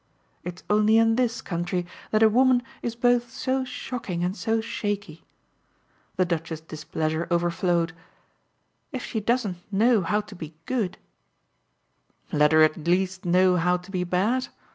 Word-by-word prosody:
It's 180 0 -7
only 215 +1 +4
in 225 0 +4
this 240 -1 0
country 175 0 -2 0.2
that 215 +1 +3
a - - +8
woman 250 +2 +4 0.2
is 235 -1 -3
both 245 0 +2
so 260 +2 -1
shocking 225 -8 -4
and 180 +2 -1
so 225 0 0
shaky." 205 -7 -4 0.9
The 185 - +2
Duchess's 165 -2 -3
displeasure 160 +1 -3
overflowed. 170 -1 +1 1.0
"If 260 -3 -4
she 220 - -2
doesn't 215 -4 0
know 220 +2 +4
how 210 +5 +1
to 210 -1 -13
be 160 -3 -8
good 215 -8 -1 0.7
" - - -40
"Let 150 0 +4
her 155 0 +6
at 155 +1 +1
least 185 +2 +1
know 180 +1 +4
how 180 +1 +2
to 180 +2 -13
be 180 -2 -1
bad? 205 +9 +1
185 Hz, 150 wpm, -25 LUFS, 170-225 Hz, 1.0 s, a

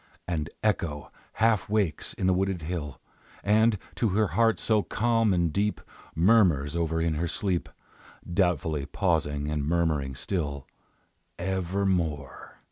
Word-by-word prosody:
And 80 -4 -2
Echo 80 -10 -1 0.2
half 110 -3 +2
wakes 100 -7 0
in - - -2
the 95 - +4
wooded 95 -2 -1
hill, 75 -5 -4 0.4
And, 110 +1 +4 0.2
to 115 - +2
her 105 +2 +1
heart 115 -1 +2
so 110 -2 +2
calm 115 0 +1
and 85 -4 +1
deep, 105 +1 0 0.4
Murmurs 85 -6 +4
over 80 -1 0
in 80 -1 +1
her 85 +3 -1
sleep, 90 +1 -1 0.6
Doubtfully 85 -5 0
pausing 75 -4 0
and 75 -2 -1
murmuring 75 -4 0
still, 70 -2 -3 0.7
"Evermore!" 90 -6 -2
85 Hz, 125 wpm, -27 LUFS, 75-100 Hz, 0.7 s, the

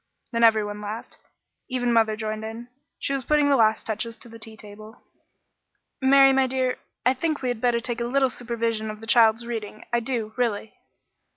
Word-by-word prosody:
Then 230 -1 0
every 220 -2 +6
one 205 0 -6
laughed. 210 +2 -7 0.5
Even 245 -2 0
mother 220 -1 +3
joined 215 0 -4
in. 225 +2 -7 0.3
She 275 - -2
was 270 -1 -2
putting 295 +2 +3
the - - +5
last 220 -3 +3
touches 225 +1 -4
to 235 - -13
the 230 0 -12
tea 220 0 -8
table. 215 +2 -12 1.0
"Mary, 270 0 +6
my 265 0 +3
dear, 255 -1 -1 0.3
I 255 - +5
think 305 +2 -2
we'd 245 -3 -2
better 240 -1 +2
take 235 0 -4
a - - 0
little 265 +1 +2
supervision 230 -2 -2
of 215 0 -7
the 225 - -10
child's 225 0 +4
reading 220 -3 -6
I 240 - +4
do, 230 -3 -3
really." 225 -3 -1
230 Hz, 190 wpm, -25 LUFS, 220-250 Hz, 1.0 s, every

